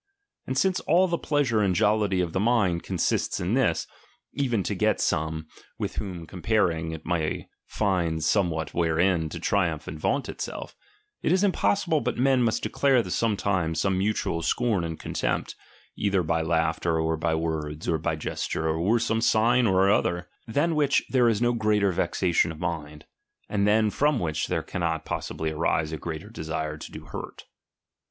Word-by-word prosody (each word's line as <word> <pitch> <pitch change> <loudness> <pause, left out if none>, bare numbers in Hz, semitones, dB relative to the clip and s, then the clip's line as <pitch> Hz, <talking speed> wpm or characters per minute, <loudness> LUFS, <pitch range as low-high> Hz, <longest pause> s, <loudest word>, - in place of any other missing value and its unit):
And 130 - -2
since 185 +6 +2
all 185 +2 +3
the 170 -1 -1
pleasure 140 -7 +1
and 95 -3 +2
jollity 105 -3 +2
of 85 -2 -2
the - - 0
mind 100 -6 +2
consists - - -1
in 90 +5 -1
this, 120 -11 +2 0.5
even 120 -8 0
to - - -2
get - - +1
some, 80 0 -1 0.3
with - - -4
whom 90 -5 -5
comparing, 85 -2 0
it 80 -1 -8
may 80 -2 -1 0.2
find 85 -6 0
somewhat 80 -4 +1
wherein 85 0 +1
to - - -6
triumph 80 -6 0
and 80 - -6
vaunt 140 - 0
itself; - - -6 0.5
it - - +1
is 190 +2 +3
impossi 200 0 +1
ble 160 -3 +2
but 125 +1 -2
men 130 0 +3
must 115 -2 +1
declare 130 -6 +2
sometimes 95 -7 0
some 95 +3 +1
mutual 100 -4 0
scorn 105 +2 +1
and 80 -1 -4
contempt, - - -2 0.4
either 100 -3 +1
by 80 0 0
laughter, 80 0 0
or 80 0 +1
by 80 0 0
words, 80 -1 -3
or 80 -2 +1
by 80 - -1
gesture, 80 +1 -3
or 85 +9 +2
some 115 -1 0
sign 115 +2 +3
or 95 0 +4
other; 90 -3 +1 0.2
than 145 +9 +1
which 145 -3 +2
there 125 -3 +4
is 115 +1 +1
no 120 0 +3
greater 105 -3 +2
vexation 85 -1 +1
of 80 - -9
mind, 75 -3 -5 0.4
and 100 -1 +1
than 105 0 +3
from 145 +3 +2
which 80 -5 -1
there - - -1
cannot 85 -3 -2
possibly 80 0 -3
arise 80 0 0
a 80 - -3
greater 85 +6 -6
desire 80 -5 -4
to - - -9
do - - -9
hurt. - - -8
95 Hz, 175 wpm, -26 LUFS, 80-115 Hz, 0.5 s, or